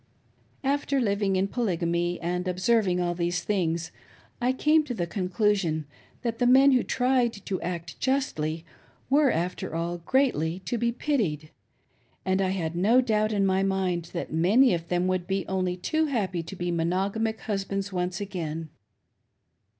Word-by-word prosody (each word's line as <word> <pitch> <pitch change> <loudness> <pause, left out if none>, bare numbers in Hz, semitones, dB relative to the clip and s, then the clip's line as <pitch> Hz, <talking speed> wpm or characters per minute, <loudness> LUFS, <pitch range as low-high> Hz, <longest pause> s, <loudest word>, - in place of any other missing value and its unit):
After 280 0 +1
living 200 -4 +1
in 190 +1 +1
Polygamy 175 -6 -1
and 180 +2 -2
observing 185 0 +2
all 175 -1 0
these 175 0 -1
things, 170 -5 -1 0.5
I 250 +1 +3
came 305 +4 +3
to 250 -4 -4
the 175 -5 -1
conclusion 180 -3 0 0.4
that 230 -2 -2
the 245 - +3
men 270 +2 +7
who 255 -2 +4
tried 250 -1 +1
to 190 - -2
act 170 -2 -5
justly 165 - -1 0.5
were, 285 0 +5
after 175 -3 -2
all, 170 +1 -2
greatly 170 - +1
to 240 - -2
be 235 +1 +1
pitied; 210 - -1 0.7
and 190 +1 +1
I 190 - +1
had 170 -4 -2
no 210 +8 +4
doubt 215 -3 +1
in 200 -2 +2
my 190 0 +2
mind 190 -3 0
that 170 -3 -4
many 210 +11 +4
of 170 -1 -3
them 175 +1 0
would 185 -1 -1 0.2
only 185 -1 -1
be 180 - -19
too 315 - +1
happy 195 - -1
to 165 +4 -8
be 175 -1 -2
mono 175 +4 0
gamic 220 +1 -2
husbands 195 -1 -3
once 180 0 -2
again. 165 -5 -4
190 Hz, 160 wpm, -27 LUFS, 175-230 Hz, 0.7 s, men